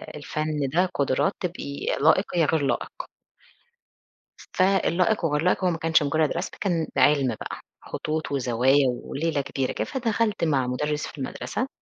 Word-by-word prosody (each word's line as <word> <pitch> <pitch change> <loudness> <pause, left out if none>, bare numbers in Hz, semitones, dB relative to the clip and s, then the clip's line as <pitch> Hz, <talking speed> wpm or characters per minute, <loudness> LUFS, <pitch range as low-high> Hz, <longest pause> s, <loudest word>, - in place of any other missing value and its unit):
الفَن 150 -1 -2
ده 180 +2 +3
قُدُرَات، 140 0 +1
تبقي 165 -6 -5 0.2
لائِق 160 +6 +5
يا 165 - +4
غير 160 0 +1
لائِق. 140 - -2 1.5
فالائِق 185 0 +2
وغير 150 -2 +1
لائق 180 +2 +1
هو - - +4
ما 165 - -1
كانش 160 -2 +3
مُجرّد 155 +1 +1
رسم، 175 +3 -3
كان 170 -5 0
عِلْمُ 145 -2 +4
بقى. - - -6 0.2
خطوط 155 -1 -4
وزوايا 130 +1 +3
وليلة 145 +5 -2
كبيرة 135 -1 -2
كده، - - -2
فدخلت 230 -6 -1
مع 140 -6 +2
مُدرِّس 150 +4 -2
في - - -11
المَدرسة 195 - -3
155 Hz, 145 wpm, -25 LUFS, 140-175 Hz, 1.5 s, لائِق